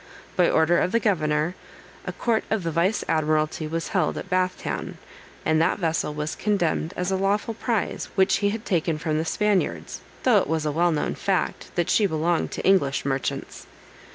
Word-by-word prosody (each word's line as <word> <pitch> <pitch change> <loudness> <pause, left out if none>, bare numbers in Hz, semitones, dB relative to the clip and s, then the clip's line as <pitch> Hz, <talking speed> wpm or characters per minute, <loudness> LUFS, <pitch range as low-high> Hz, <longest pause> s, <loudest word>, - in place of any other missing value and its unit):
By 180 -2 +4
order 160 +2 +3
of 180 - 0
the 230 - +4
governor, 155 -6 +1 0.5
a - - -1
court 230 -2 0
of 220 -4 0
vice 170 +5 +1
admiralty 155 0 0
was 165 +1 -3
held - - 0
at 190 - -7
Bath 185 0 +1
town, - - -5 0.5
and 160 0 +3
that 165 - +2
vessel 165 -5 -1
was 150 +1 -3
condemned 175 -5 0
as 180 +1 -1
a - - +2
lawful 200 +4 0
prize 225 -1 -2
which 190 -1 +4
he 205 - +1
had 220 +2 -4
taken 165 -3 0
from 155 0 -1
the 160 - -1
Spaniards, 210 +2 0 0.2
though 245 -5 +5
it - - -2
was 160 0 -1
a 150 - +1
well 170 +3 +2
known 150 - -1
fact - - -1
that 175 - +1
she 210 - +4
belonged 165 0 0
to - - -4
English 145 -10 +3
merchants. 135 -1 -3
170 Hz, 185 wpm, -24 LUFS, 155-195 Hz, 0.5 s, though